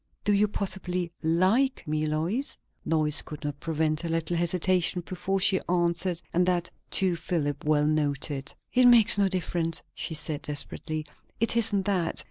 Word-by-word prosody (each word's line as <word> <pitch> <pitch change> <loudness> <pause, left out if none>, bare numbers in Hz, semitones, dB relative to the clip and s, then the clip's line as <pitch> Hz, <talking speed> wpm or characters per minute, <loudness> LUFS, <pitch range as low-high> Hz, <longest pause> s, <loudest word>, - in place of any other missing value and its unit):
Do 205 - +2
you, 205 +1 +3
possibly 185 -3 -2
like 185 - +1
me, 155 0 -1
Lois?" 170 - -2 0.3
Lois 155 -2 +2
could 150 +1 -10
not 145 -1 -4
prevent 155 0 -1
a 170 - -3
little 165 +1 -1
hesitation 175 +1 +1
before 190 +1 -2
she 190 0 +3
answered, 175 0 0
and 180 - +3
that, 175 -1 0 0.2
too, 185 -3 +3
Philip 145 -5 -2
well 150 -1 +3
noted. 145 -2 -1 0.2
"It 250 0 +6
makes 230 -4 +6
no 200 - +4
difference," 175 -3 -2
she 160 - -4
said 155 -1 +1
desperately. 155 +1 -3 0.3
"It 230 +1 +2
isn't 205 -4 +3
that. 185 -5 0
170 Hz, 155 wpm, -27 LUFS, 155-190 Hz, 0.3 s, It